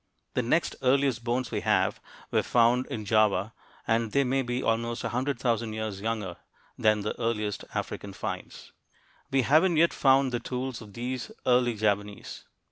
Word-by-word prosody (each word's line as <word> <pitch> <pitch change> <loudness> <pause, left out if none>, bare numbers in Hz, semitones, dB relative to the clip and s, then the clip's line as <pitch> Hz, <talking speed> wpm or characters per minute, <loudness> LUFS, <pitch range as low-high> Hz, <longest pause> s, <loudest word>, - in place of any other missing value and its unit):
The 125 - +1
next 125 +8 +1
earliest 130 -2 +2
bones 120 0 -1
we - - -1
have - - +1 0.3
were - - +3
found 120 +2 +3
in 110 -2 -5
Java, 110 0 +2 0.3
and 115 -1 0
they 140 - +4
may 135 +1 +1
be 125 0 -2
almost 115 +1 -1
a - - -1
hundred 130 +2 -1
thousand 115 -3 0
years 110 -3 -4
younger 105 -5 -3 0.4
than 105 -1 +2
the 105 - -3
earliest 105 -3 -2
African - - -4
finds. - - -6 0.6
We 135 -1 +2
haven't 160 +6 +4
yet 170 +2 +4
found 135 -1 +4
the 120 - -1
tools 125 -1 -4
of 105 -3 -12
these 125 +2 -4
early 125 -2 +3
Javanese. 105 -1 -2
120 Hz, 165 wpm, -28 LUFS, 110-130 Hz, 0.6 s, they